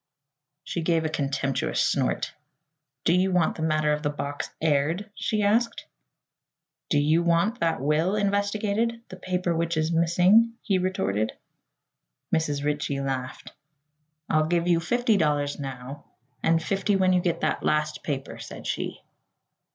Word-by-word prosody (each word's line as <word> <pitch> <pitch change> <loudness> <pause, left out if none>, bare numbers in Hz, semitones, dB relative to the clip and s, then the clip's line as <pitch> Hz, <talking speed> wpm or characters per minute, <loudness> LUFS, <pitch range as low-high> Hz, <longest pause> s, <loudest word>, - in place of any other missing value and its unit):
She 170 - -3
gave 165 -1 +1
a - - 0
contemptuous 140 -2 -1
snort. - - 0 0.7
"Do 170 - +3
you 185 +1 +2
want 180 -3 +2
that - - -5
matter 155 -1 +2
of 150 - -2
the 145 - 0
box 145 -1 -4
aired?" 160 +7 0
she 215 0 -1
asked. 230 +3 +1 1.0
"Do 145 - +2
you 155 +3 +3
want 170 +8 +2
that 165 -1 +1
will 155 +8 +1
investigated 205 +3 0
the - - -8
paper 180 -2 -1
which 170 0 -1
is 155 +1 +1
missing?" 180 +7 +4
he 195 -5 +1
retorted. 110 - -1 1.0
Mrs. 145 -3 -1
Ritchie 145 -1 -1
laughed. 130 -1 -4 0.8
"I'll 155 0 +2
give 170 +1 +1
you 170 -1 +4
fifty 235 +5 +1
dollars 145 -4 0
now, 135 +1 -7 0.4
and 165 0 +2
fifty 195 +2 0
when 185 -1 +3
you 180 - +3
get 175 -2 -1
that - - 0
last 150 0 0
paper," 140 -3 -4
said - - -9
she. - - -3
165 Hz, 145 wpm, -26 LUFS, 150-190 Hz, 1.0 s, missing